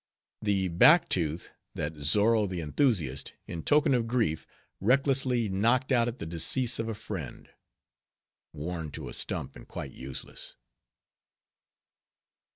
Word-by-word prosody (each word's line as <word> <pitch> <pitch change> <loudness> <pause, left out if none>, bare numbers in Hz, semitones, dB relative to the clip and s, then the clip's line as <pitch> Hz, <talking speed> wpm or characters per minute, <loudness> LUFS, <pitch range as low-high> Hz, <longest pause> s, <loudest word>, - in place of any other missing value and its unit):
The 100 -3 +1
back 150 - +6
Tooth, 80 -1 -1 0.2
that 75 +2 -3
Zozo 105 +9 +2
the 90 -2 -4
Enthusiast, 80 - 0
in 85 - -6
token 145 - +3
of 120 -2 +1
grief, 115 -10 0 0.3
recklessly 130 0 +2
knocked 115 +8 +1
out 120 -2 +3
at 120 +1 -4
the - - -6
decease 110 +10 +2
of 115 0 -2
a 110 - -3
friend. 100 - -7 1.0
(Worn 80 +1 -5
to - - -7
a - - -9
stump - - -4
and - - -13
quite 70 - -7
useless). 65 0 -8
105 Hz, 130 wpm, -29 LUFS, 80-125 Hz, 1.0 s, back